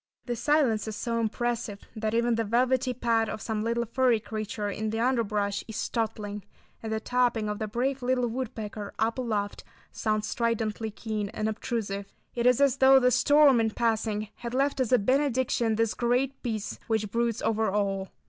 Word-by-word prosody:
This 240 -3 -3
silence 270 -8 +2
is 215 - -4
so 230 +2 -2
impressive 225 -2 -2
that 215 0 -1
even 235 +1 +2
the 230 0 +1
velvety 250 +4 +2
pad 230 -2 +1
of - - -4
some 215 0 -3
little 235 +1 0
furry 245 0 +2
creature 215 -1 -4
in 215 +2 -2
the 225 +1 -2
underbrush 215 -5 0
is 220 - -7
startling, 210 -3 -3 0.4
and 220 - -5
the 220 - 0
tapping 240 -2 +1
of 210 0 -3
the 215 - -2
brave 260 +5 -1
little 250 0 +1
woodpecker 220 -4 -5
up 225 +3 0
aloft 210 -5 -2 0.3
sounds 215 -1 -1
stridently 225 -2 -1
keen 215 -1 -4
and 215 - -1
obtrusive. 205 -2 -3 0.2
It 240 0 +1
is 250 0 +4
as 275 -2 +3
though 270 0 +7
the 250 -1 +3
storm 290 0 +5
in 225 -1 +2
passing 220 -2 -1
had 235 +1 -5
left 275 +1 +1
as 255 -3 0
a 250 - +7
benediction, 255 -1 +1
this 225 0 +1
great 250 +3 0
peace 220 -4 -4
which 220 -3 -1
broods 235 -1 0
over 220 -1 +1
all. 195 -1 -1
225 Hz, 180 wpm, -28 LUFS, 215-245 Hz, 0.4 s, though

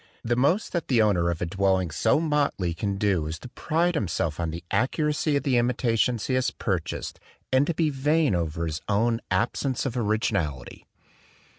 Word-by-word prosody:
The 120 +1 +1
most 145 - +1
that 170 -2 -2
the 125 -4 +3
owner 95 -6 +3
of 85 0 -2
a - - 0
dwelling 95 -1 +1
so 110 - +2
motley 145 - 0
can 100 +3 -2
do 95 -6 +1
is 80 +2 -4
to 125 - -11
pride 170 +7 0
himself 85 - -1
on 85 -1 -1
the 85 +2 -6
accuracy 150 +2 +1
of 140 - 0
the 130 -3 +2
imitations 120 -1 +1
he 130 - -1
has 130 0 +2
purchased 95 -6 -3 0.3
and 135 +2 +4
to 170 - -1
be 160 -2 +1
vain 145 0 +2
over 85 -1 -1
his 80 -1 -4
own 115 +3 +1
absence 130 +3 0
of 130 -2 -2
originality. 105 - -2
115 Hz, 180 wpm, -26 LUFS, 85-135 Hz, 0.3 s, and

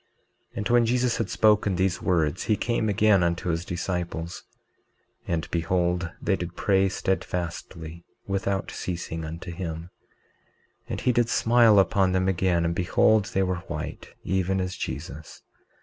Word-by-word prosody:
19:30 - - -12
And 105 - -2
when 120 -1 +5
Jesus 125 0 +1
had 115 - -2
spoken 105 -3 +3
these 95 +1 0
words 85 -2 +1
he 110 - +2
came 115 -2 0
again 105 -1 +4
unto 85 +1 0
his 85 0 -1
disciples; 85 -1 -4 0.9
and 85 -2 -1
behold 90 +1 0
they 100 - +1
did 90 -1 -6
pray 95 -1 +2
steadfastly, 85 -3 -4 0.2
without 95 -1 -2
ceasing, 85 -2 -4
unto 80 +3 -6
him; 85 0 -6 1.0
and - - -3
he 125 - +3
did 120 -1 +2
smile 115 -2 +5
upon 95 0 +3
them 95 0 +1
again; 90 -2 +1
and 85 - 0
behold 95 +4 +3
they 95 -1 0
were 95 -1 -1
white, - - -6
even 95 +1 0
as 90 0 -2
Jesus. 75 +3 -7
95 Hz, 150 wpm, -26 LUFS, 85-100 Hz, 1.0 s, when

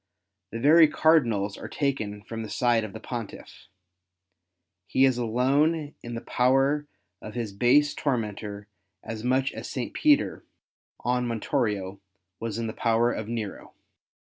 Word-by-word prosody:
The 115 - -5
very 155 +5 +7
cardinals 120 -11 +2
are - - -7
taken 110 -8 -2
from 115 +1 -6
the 110 - -6
side 120 -3 +2
of 110 - -6
the 110 - -7
Pontiff. 115 -5 -8 1.2
He 135 - +4
is 130 -2 +2
alone 140 +6 +1
in 120 0 -6
the 115 - -5
power 135 +4 +2 0.3
of 105 - -9
his 115 -4 -3
base 140 +8 +4
tormentor 105 -7 -3 0.4
as 110 -1 -6
much 130 +2 +1
as - - -7
St. 130 -4 -4
Peter 295 -1 +2 0.6
on 125 0 0
Montorio 105 -5 -2 0.4
was 115 -2 -4
in 115 - -2
the 110 - -4
power 115 +1 +2
of 110 - -4
Nero. 110 -4 -6
120 Hz, 140 wpm, -26 LUFS, 110-135 Hz, 1.2 s, very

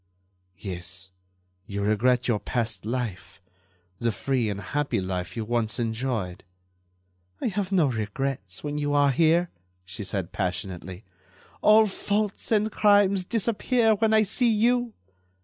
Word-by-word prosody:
"Yes, 90 -1 -7 0.6
you 100 0 -3
regret 120 +4 +2
your 115 -4 +1
past 110 -4 -2
life—the 90 -3 -6
free 120 +2 -1
and 100 -1 -3
happy 140 +2 -1
life 95 +2 -4
you 110 - -2
once 115 -1 -1
enjoyed." 115 -5 -2 1.0
"I - - 0
have 195 -1 -3
no 180 -5 +4
regrets 110 -4 -3
when 150 0 -3
you 145 0 0
are 145 -1 +4
here," 165 +5 +3 0.3
she 90 +3 -6
said, 95 -3 -3
passionately. 90 0 -4 0.6
"All 215 +1 +6
faults 205 +1 -2
and 215 0 +2
crimes 205 -3 +4
disappear 230 +2 +2
when 220 +1 +1
I 220 0 +5
see 235 +4 +2
you. 235 +2 +2
120 Hz, 130 wpm, -26 LUFS, -, 1.0 s, All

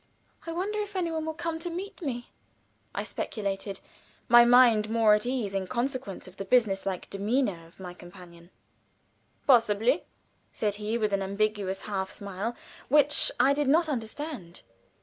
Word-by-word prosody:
"I - - -2
wonder 390 +5 -2
if 410 -1 -7
any 350 -3 -1
one 320 -1 -3
will 320 - -3
come 330 -1 -3
to 350 +2 -3
meet 375 +4 -6
me," 245 -6 -4 0.6
I - - -1
speculated, 200 -2 -4 0.5
my 240 0 +8
mind 240 -3 +6
more 225 -1 +4
at 210 +3 +1
ease 245 -6 -2
in 195 -1 -2
consequence 250 -4 -3
of 185 +1 -14
the - - -4
business 205 -4 +2
like 185 -2 -3
demeanor 200 -4 -1
of 165 - -24
my 180 -2 -7
companion. 175 -1 -14 1.0
"Possibly," 235 - +3 0.5
said 210 -2 -1
he, 215 +2 -1
with 215 -3 0
an 200 - +1
ambiguous 200 -1 -1
half 190 -2 -3
smile, 200 +5 -5 0.3
which 295 +1 +5
I 275 - +5
did 290 0 0
not 320 +4 +4
understand. 240 - -5
225 Hz, 160 wpm, -28 LUFS, 195-280 Hz, 1.0 s, my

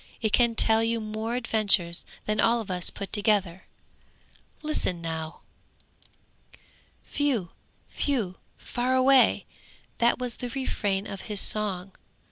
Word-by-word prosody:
It 220 -2 -1
can 235 -2 +4
tell 220 0 +3
you 230 0 +1
more 220 +2 -3
adventures 210 -7 +2 0.2
than 215 0 -1
all 235 +1 +4
of 215 -4 -5
us 180 -1 0
put 200 -2 -7
together. 200 -4 +1 1.0
Listen 300 - -1
now: 160 -1 -5 1.7
'Whew! 255 -12 0 0.5
Whew! 225 -11 0 0.2
Fare 250 +1 -1
away!' 260 0 +5 0.5
That 235 0 +3
was 250 -2 -3
the 245 - -5
refrain 205 -6 -2
of 200 +2 -7
his 210 -2 0
song. 195 -3 0
215 Hz, 120 wpm, -27 LUFS, 195-240 Hz, 1.7 s, away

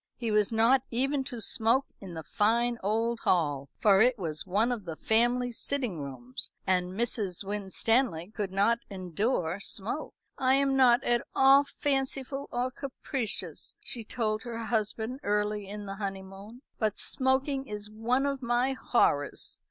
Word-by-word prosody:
He 230 -3 -3
was 210 0 +3
not 230 +4 +4
even 270 +3 +1
to 245 -3 -6
smoke 230 +5 +2
in 185 -4 -9
the 160 - -5
fine 235 +7 +1
old 225 +3 0
hall, 145 -6 +1
for 200 -2 +5
it 245 +1 +4
was 165 -2 -4
one 210 +6 +2
of 225 -6 -3
the 165 -2 -5
family 240 +5 +2
sitting 240 - -2
rooms, 130 -2 -4 0.2
and 180 -1 +1
Mrs. 205 -4 -1
Winstanley 200 -1 0
could 205 -4 -3
not 205 +5 +2
endure 185 -1 -1
smoke. 215 +9 -2 0.2
"I 260 0 +4
am 275 0 +2
not 255 -1 +5
at 240 0 +2
all 270 +1 +7
fanciful 275 -1 -2
or 250 +1 -1
capricious," 265 -3 -4
she 240 -4 -5
told 215 -1 -1
her 235 -2 -6
husband 225 +2 -2
early 210 -2 0
in 205 +1 -6
the 195 0 -6
honeymoon, 195 +4 -7 0.2
"but 215 -2 0
smoking 265 +1 +1
is 210 -1 -5
one 240 +5 0
of 275 -1 -1
my 240 +2 +1
horrors. 145 - +1
225 Hz, 150 wpm, -29 LUFS, 195-255 Hz, 0.2 s, all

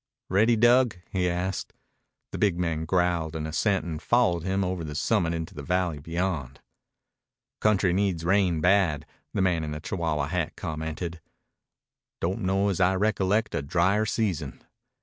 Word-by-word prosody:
"Ready, 110 +5 +4
Dug?" 120 -1 +4
he 90 -2 +1
asked. 90 +2 -3 0.6
The - - -5
big 100 -5 +2
man 80 -2 -1
growled 85 -2 0
an 80 -1 -3
assent 90 +5 0
and 80 -3 -5
followed 90 -9 +2
him 95 +3 0
over 90 -2 -2
the 75 -1 -6
summit 80 +2 +1
into 80 -1 -5
the 75 - -7
valley 90 -1 -1
beyond. 80 -4 -3 1.0
"Country 100 -4 +2
needs 95 -4 0
a - - -5
rain 90 -3 +2
bad," 90 -5 +3 0.3
the 95 - +2
man 90 -4 +1
in 75 - -4
the 75 - -5
Chihuahua 80 -3 -2
hat 85 -2 -2
commented. 80 +2 -5 1.0
"Don't 90 +3 -2
know 95 +2 +1
as 95 - -1
I 95 +1 +4
recollect 105 +1 +1
a - - -1
dryer 95 +8 +1
season." 90 - -2
90 Hz, 160 wpm, -26 LUFS, 80-95 Hz, 1.0 s, Ready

